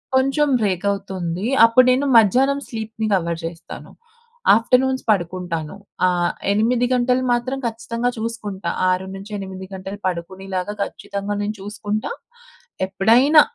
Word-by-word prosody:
కొంచెం 275 Hz, +3 st, +3 dB
బ్రేకవుతుందీ. 195 Hz, -1 st, -2 dB, 0.2 s
అప్పుడు 240 Hz, +2 st, +5 dB
నేను 270 Hz, +3 st, +2 dB
మధ్యాహ్నం 260 Hz, +7 st, +4 dB
స్లీప్‌ని 220 Hz, -1 st, -4 dB
కవర్ 170 Hz, -3 st, 0 dB
జేస్తాను. 165 Hz, 0 st, -8 dB, 0.6 s
ఆఫ్టర్‌నూన్స్ 260 Hz, +3 st, +2 dB
పడుకుంటాను. 175 Hz, -3 st, -2 dB, 0.3 s
ఆహ్, 175 Hz, -1 st, +2 dB, 0.2 s
8 235 Hz, +4 st, +2 dB
గంటలు 250 Hz, +1 st, +2 dB
మాత్రం 255 Hz, +3 st, -1 dB
ఖచ్చితంగా 230 Hz, +1 st, -2 dB
చూసుకుంటా. 210 Hz, -5 st, -4 dB, 0.2 s
6-8 190 Hz, +1 st, -4 dB
గంటలు 190 Hz, +2 st, -6 dB
పడుకునేలాగా 185 Hz, +2 st, -4 dB
ఖచ్చితంగా 200 Hz, +1 st, -5 dB
నేను 210 Hz, +1 st, -2 dB
చూసుకుంటా. 210 Hz, -, -4 dB, 0.8 s
ఎప్పుడైనా 240 Hz, +11 st, +5 dB
205 Hz, 100 wpm, -21 LUFS, 190-240 Hz, 0.8 s, అప్పుడు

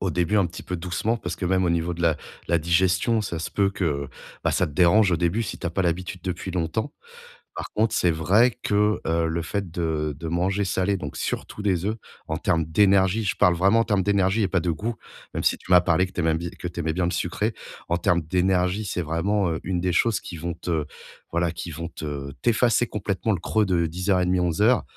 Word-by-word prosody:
au 95 Hz, -, 0 dB
début 90 Hz, +6 st, +1 dB
un 95 Hz, -4 st, +4 dB
petit 85 Hz, -, -9 dB
peu 90 Hz, -, -3 dB
doucement 90 Hz, +7 st, -1 dB
parce -, -, -5 dB
que, -, -, -4 dB
même 95 Hz, 0 st, +2 dB
au 85 Hz, -, +2 dB
niveau 85 Hz, +1 st, 0 dB
de 85 Hz, -, -5 dB
la 80 Hz, -2 st, +3 dB, 0.3 s
la 85 Hz, -, +3 dB
digestion. 90 Hz, +7 st, +2 dB
Ça 85 Hz, -5 st, -4 dB
se 80 Hz, -, -4 dB
peut 100 Hz, -1 st, +2 dB
que 75 Hz, -8 st, -2 dB, 0.3 s
bah -, -, +1 dB
ça -, -, +1 dB
te 75 Hz, -, -9 dB
dérange 95 Hz, +4 st, +4 dB
au -, -, +3 dB
début, 90 Hz, +7 st, 0 dB
si -, -, -6 dB
tu 85 Hz, -, -4 dB
as -, -, -1 dB
pas 95 Hz, -, -1 dB
l'habitude 90 Hz, +1 st, -2 dB
depuis 90 Hz, +1 st, -3 dB
longtemps. 90 Hz, -, -2 dB, 0.6 s
Par -, -, -5 dB
contre, 110 Hz, +1 st, +1 dB
c'est 90 Hz, -, +3 dB
vrai 95 Hz, +10 st, +3 dB
que, 105 Hz, +1 st, +2 dB
heu, 80 Hz, 0 st, +1 dB
le 80 Hz, +1 st, -1 dB
fait 95 Hz, +1 st, -3 dB
de 80 Hz, -3 st, -1 dB
de 80 Hz, -, -5 dB
manger 95 Hz, +4 st, 0 dB
salé, 95 Hz, +2 st, 0 dB
donc 75 Hz, -5 st, -6 dB
surtout 105 Hz, -, -4 dB
des 95 Hz, -3 st, 0 dB
œufs. 110 Hz, +2 st, 0 dB, 0.3 s
En -, -, -2 dB
termes 80 Hz, -2 st, +1 dB
d'énergie, 100 Hz, +4 st, +3 dB
je 100 Hz, -, 0 dB
parle 90 Hz, -1 st, +4 dB
vraiment 100 Hz, +6 st, +4 dB
en -, -, +4 dB
termes 100 Hz, -4 st, +1 dB
d'énergie 100 Hz, +1 st, +2 dB
et 100 Hz, -, +2 dB
pas 95 Hz, -, +2 dB
de 85 Hz, 0 st, 0 dB
goût, 110 Hz, +8 st, -3 dB, 0.4 s
même -, -, -3 dB
si -, -, +2 dB
tu 90 Hz, -, -10 dB
m'as 90 Hz, -1 st, +8 dB
parlé 90 Hz, +1 st, +2 dB
que 95 Hz, -, -11 dB
tu -, -, -6 dB
aimais 80 Hz, -1 st, +2 dB
bi 85 Hz, +1 st, -3 dB
que 90 Hz, -2 st, -6 dB
tu 85 Hz, 0 st, -7 dB
aimais 80 Hz, 0 st, -1 dB
bien 90 Hz, 0 st, 0 dB
le 85 Hz, -, 0 dB
sucré. 95 Hz, +5 st, -1 dB, 0.3 s
En 85 Hz, +1 st, +1 dB
termes 85 Hz, -1 st, +2 dB
d'énergie, 90 Hz, +4 st, +1 dB
c'est 90 Hz, -, -2 dB
vraiment, 90 Hz, +4 st, 0 dB
heu, 80 Hz, -, -2 dB
une 90 Hz, -2 st, -1 dB
des 90 Hz, -1 st, +1 dB
choses 115 Hz, +1 st, +2 dB
qui 90 Hz, -, -8 dB
vont 85 Hz, +2 st, -3 dB
te 80 Hz, -3 st, -2 dB, 0.5 s
voilà, 85 Hz, 0 st, +1 dB
qui 85 Hz, 0 st, -6 dB
vont 85 Hz, +2 st, -5 dB
te 70 Hz, -3 st, -6 dB
t'effacer 120 Hz, 0 st, +3 dB
complètement 105 Hz, +2 st, -2 dB
le 90 Hz, -, -2 dB
creux 110 Hz, +4 st, +1 dB
de 85 Hz, -3 st, +1 dB
10:30-11:00. 90 Hz, +4 st, +2 dB
90 Hz, 235 wpm, -24 LUFS, 85-100 Hz, 0.6 s, m'as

